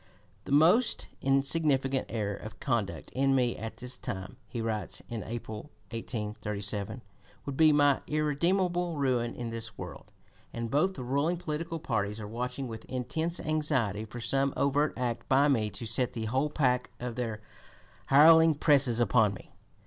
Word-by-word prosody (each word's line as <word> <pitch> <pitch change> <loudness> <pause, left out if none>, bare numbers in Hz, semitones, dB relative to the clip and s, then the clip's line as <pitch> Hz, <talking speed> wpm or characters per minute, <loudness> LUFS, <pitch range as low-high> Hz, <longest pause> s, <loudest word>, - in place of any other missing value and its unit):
"The - - -7
most 170 - +4
insignificant 135 -1 +2
error 105 -3 -2
of 110 - -10
conduct 120 -8 -2
in 135 +1 +2
me 125 -2 +2
at 115 +1 -7
this 125 0 -4
time," 95 +5 -6
he 120 - -5
writes 110 -2 -3
in 115 -2 -4
April, 110 +2 -6 0.2
1837, 105 -1 -4 0.4
"would 140 - -4
be 155 +1 +6
my 145 -2 +4
irredeemable 170 +3 0
ruin 125 -4 0
in 120 -2 -5
this 115 0 -6
world; - - -9 0.4
and 115 -1 -4
both 185 +7 +2
the 130 - -6
ruling 140 +7 0
political 165 0 -4
parties 105 -8 -2
are 105 - -6
watching 125 +4 -4
with 115 -1 -7
intense 160 +7 -2
anxiety 145 - 0
for 110 +2 -8
some 135 +3 0
overt 140 +3 +1
act 120 -2 -3
by 135 +2 +5
me 115 -7 +2
to 115 - -6
set 115 +3 0
the 110 -1 -3
whole 130 +6 0
pack 125 -4 +1
of 125 -1 -4
their 115 -3 -3 0.7
hireling 160 +3 +7
presses 140 -5 +3
upon 110 -3 +3
me." - - -14
130 Hz, 155 wpm, -30 LUFS, 115-150 Hz, 0.7 s, hireling